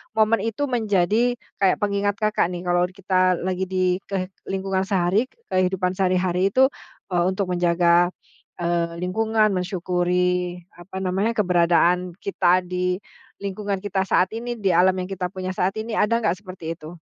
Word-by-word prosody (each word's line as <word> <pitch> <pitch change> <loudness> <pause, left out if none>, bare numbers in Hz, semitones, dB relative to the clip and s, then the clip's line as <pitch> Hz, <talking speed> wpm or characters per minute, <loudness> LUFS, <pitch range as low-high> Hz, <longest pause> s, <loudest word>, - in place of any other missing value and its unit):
momen 220 0 +3
itu 225 +6 -2
menjadi 220 +2 +2 0.2
kayak 195 -2 +4
pengingat 205 0 0
Kakak 215 -4 +1
nih 175 0 -6
kalau 175 0 +2
kita 185 -1 +1
lagi 185 0 -1
di 185 0 +1
ke 190 -1 -3 0.2
lingkungan 190 0 -1
sehari 195 +5 +1
ke - - -34 0.2
kehidupan 185 0 +1
sehari 185 -1 +1
hari 180 +1 +1
itu, 265 +2 +5 0.4
eee, 175 -1 +2
untuk 190 -1 -1
menjaga, 175 0 +3 0.5
eee, 170 -1 -1
lingkungan, 220 +2 +2
mensyukuri 180 -1 0 0.2
apa 190 +2 -7
namanya, 195 +5 0
keberadaan 180 -1 +2
kita 185 -2 +1
di 180 0 -1 0.5
lingkungan 200 0 -3
kita 190 -1 -1
saat 185 +2 +2
ini, 240 +2 -4
di 200 -5 0
alam 185 +2 +4
yang 185 0 -4
kita 185 -2 -2
punya 185 0 -5
saat 185 +2 -1
ini, 220 0 -3
ada 230 +2 +3
nggak 210 - +3
seperti 180 -4 -7
itu? 160 +2 -11
185 Hz, 160 wpm, -23 LUFS, 180-200 Hz, 0.5 s, itu